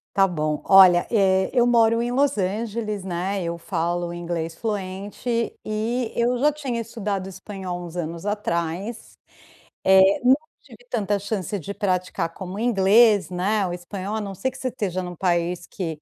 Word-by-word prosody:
Está 195 Hz, 0 st, +5 dB
bom. 155 Hz, -4 st, -2 dB
Olha, 185 Hz, -2 st, +7 dB
eh, 190 Hz, -4 st, +3 dB
eu 245 Hz, -2 st, +4 dB
moro 230 Hz, -1 st, +4 dB
em 240 Hz, +1 st, -1 dB
Los 280 Hz, +1 st, +2 dB
Angeles, 210 Hz, +1 st, -2 dB
né, 190 Hz, +2 st, -2 dB
eu 170 Hz, 0 st, -3 dB
falo 170 Hz, 0 st, -2 dB
inglês 170 Hz, -1 st, -4 dB
fluente 205 Hz, +4 st, -3 dB
e 225 Hz, +3 st, -2 dB
eu 240 Hz, +1 st, +1 dB
já 295 Hz, +4 st, +3 dB
tinha 270 Hz, -6 st, -3 dB
estudado 205 Hz, -4 st, -4 dB
espanhol 190 Hz, -1 st, -6 dB
uns 170 Hz, 0 st, -10 dB
anos 170 Hz, 0 st, -4 dB
atrás, 200 Hz, +1 st, -3 dB, 0.8 s
eh, 190 Hz, +1 st, +5 dB
e -, -, -13 dB
não 255 Hz, +1 st, +7 dB, 0.3 s
tive 245 Hz, -3 st, -16 dB
tanta 205 Hz, -3 st, 0 dB
chance 200 Hz, -1 st, -3 dB
de 200 Hz, +4 st, -7 dB
praticar 185 Hz, -3 st, -1 dB
como 185 Hz, +1 st, -7 dB
inglês, 210 Hz, -2 st, +4 dB
né, 190 Hz, +3 st, 0 dB
o 175 Hz, -, -4 dB
espanhol, 190 Hz, +3 st, -5 dB
a 220 Hz, -, -2 dB
não 200 Hz, -1 st, -5 dB
ser 260 Hz, +8 st, -2 dB
que 260 Hz, -, -12 dB
você 260 Hz, -1 st, -2 dB
esteja 190 Hz, -7 st, -3 dB
num 180 Hz, 0 st, -6 dB
país 175 Hz, 0 st, -1 dB
que 160 Hz, -5 st, -5 dB
195 Hz, 170 wpm, -23 LUFS, 180-225 Hz, 0.8 s, Olha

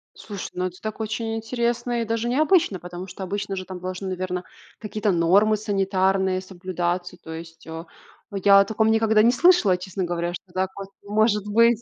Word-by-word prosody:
Слушай, 200 Hz, -3 st, -7 dB
ну, 180 Hz, 0 st, -2 dB
это 180 Hz, +1 st, -10 dB
так 215 Hz, 0 st, -5 dB
очень 225 Hz, +1 st, -2 dB
интересно 235 Hz, +1 st, -1 dB
и -, -, -1 dB
даже 230 Hz, +1 st, -1 dB
необычно, 305 Hz, -, +3 dB
потому 180 Hz, +1 st, -8 dB
что 185 Hz, +1 st, -8 dB
обычно 195 Hz, +1 st, -3 dB
же 185 Hz, -1 st, -5 dB
там 185 Hz, -1 st, -7 dB
должны, 185 Hz, +1 st, -5 dB
наверно, 180 Hz, 0 st, -3 dB, 0.4 s
какие-то 210 Hz, -1 st, -1 dB
нормы 195 Hz, +5 st, +4 dB
санитарные 190 Hz, -2 st, +1 dB
соблюдаться. 180 Hz, -1 st, -3 dB
То 160 Hz, -, -11 dB
есть, 165 Hz, 0 st, -10 dB
а, 165 Hz, +1 st, -7 dB, 0.4 s
я 200 Hz, 0 st, +6 dB
о 200 Hz, -, +5 dB
таком 220 Hz, +1 st, +2 dB
никогда 220 Hz, -1 st, +4 dB
не 235 Hz, -, +6 dB
слышала, 255 Hz, -, +5 dB
честно 185 Hz, +1 st, -4 dB
говоря, 175 Hz, 0 st, -2 dB
что 180 Hz, +1 st, -9 dB
так 185 Hz, 0 st, 0 dB
воз 195 Hz, -1 st, -7 dB, 0.2 s
может 210 Hz, 0 st, +1 dB
быть. 230 Hz, +2 st, +4 dB
195 Hz, 185 wpm, -24 LUFS, 185-220 Hz, 0.4 s, я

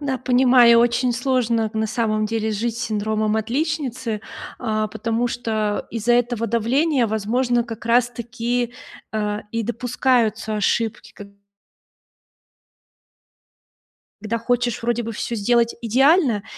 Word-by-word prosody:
Да, 270 Hz, -3 st, -2 dB
понимаю, 245 Hz, -2 st, +5 dB
очень 240 Hz, +1 st, +2 dB
сложно 235 Hz, -3 st, 0 dB
на 220 Hz, 0 st, -1 dB
самом 215 Hz, -1 st, 0 dB
деле 220 Hz, 0 st, -2 dB
жить 225 Hz, +2 st, -2 dB
с 240 Hz, -, -4 dB
синдромом 215 Hz, -1 st, -1 dB
отличницы, 255 Hz, -2 st, -2 dB, 0.4 s
а-а, 215 Hz, -2 st, -1 dB
потому 230 Hz, +2 st, -2 dB
что 220 Hz, -4 st, -2 dB
из-за 235 Hz, +1 st, +1 dB
этого 240 Hz, -1 st, 0 dB
давления, 250 Hz, +4 st, +1 dB
возможно, 235 Hz, +3 st, 0 dB
как 230 Hz, -1 st, -8 dB
раз 240 Hz, +1 st, +3 dB
таки, 235 Hz, +1 st, -3 dB, 0.4 s
э-э, 210 Hz, -1 st, -2 dB
и 230 Hz, 0 st, -1 dB
допускаются 235 Hz, -2 st, 0 dB
ошибки, 225 Hz, +2 st, -1 dB
как 200 Hz, -1 st, -11 dB
б 200 Hz, -, -25 dB, 2.9 s
Когда 225 Hz, +2 st, -2 dB
хочешь 245 Hz, 0 st, -1 dB
вроде 240 Hz, 0 st, -1 dB
бы 230 Hz, -, -4 dB
всё 235 Hz, +2 st, -4 dB
сделать 235 Hz, +2 st, +1 dB
идеально, 255 Hz, -, +3 dB
235 Hz, 125 wpm, -21 LUFS, 220-245 Hz, 2.9 s, понимаю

